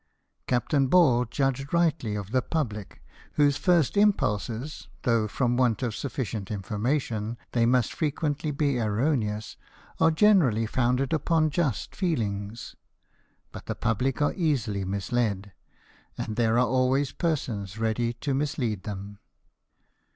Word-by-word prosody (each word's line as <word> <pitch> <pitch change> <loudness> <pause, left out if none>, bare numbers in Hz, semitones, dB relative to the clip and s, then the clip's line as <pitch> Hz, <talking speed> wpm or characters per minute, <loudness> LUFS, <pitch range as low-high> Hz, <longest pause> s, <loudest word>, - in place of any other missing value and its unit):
Captain 135 +2 +1
Ball 130 -6 +4
judged 135 +4 -1
rightly 160 -11 +1
of 100 -1 -5
the 130 0 +2
public, 110 - -4 0.3
whose 145 -2 +3
first 170 -1 +2
impulses 140 - 0
— - - -31
though 115 -3 +2
from 120 +2 0
want 125 -2 +2
of 120 -3 -1
sufficient 115 -7 -4
mformation 110 +2 -2
they 115 -1 +2
must 125 -2 +2
frequently 150 -1 -1
be 140 -3 0
erroneous 110 -1 -1 0.2
— - - -26
are - - +6
generally 160 - +4
founded 125 +5 0
upon 155 0 +2
just 155 - -1
feelings. 110 - -3 0.8
But - - -10
the - - -2
public 125 +6 0
are 145 - +1
easily 125 - 0
misled, 100 +1 -1 0.7
and 110 - -4
there 115 0 +2
are 125 - +4
always 130 +2 +1
persons 115 - -2
ready 115 +1 0
to 135 +4 -3
mislead 130 -7 -1
them. 100 0 -7
125 Hz, 130 wpm, -27 LUFS, 110-145 Hz, 0.8 s, are